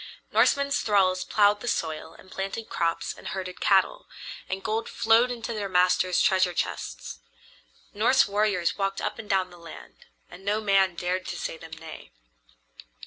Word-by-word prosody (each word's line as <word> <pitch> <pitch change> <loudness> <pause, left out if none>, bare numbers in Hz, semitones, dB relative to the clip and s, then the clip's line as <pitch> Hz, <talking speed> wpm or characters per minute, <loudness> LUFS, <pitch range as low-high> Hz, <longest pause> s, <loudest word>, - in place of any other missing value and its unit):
Norsemen's 280 0 +3
thralls 185 -3 +2
plowed 205 -1 +3
the 245 - -7
soil 160 -4 -2
and 185 - -17
planted 195 +4 -5
crops 165 -1 -1
and - - -11
herded 185 -1 -5
cattle, 200 - +2 0.4
and 190 0 -4
gold 220 +2 -2
flowed 225 +3 +3
into 235 -1 -4
their 205 -2 -3
masters' 180 0 +3
treasure 185 -2 +2
chests. - - -4 0.7
Norse - - +4
warriors 200 -3 0
walked 195 0 -1
up - - -3
and 210 - -9
down 190 -2 +1
the 175 - -14
land, 165 - -13 0.2
and 190 - -13
no 205 +2 0
man 195 -4 +2
dared 180 +1 -2
to - - -4
say - - -4
them 160 0 -12
nay. 160 - -10
190 Hz, 160 wpm, -26 LUFS, 180-210 Hz, 0.7 s, Norse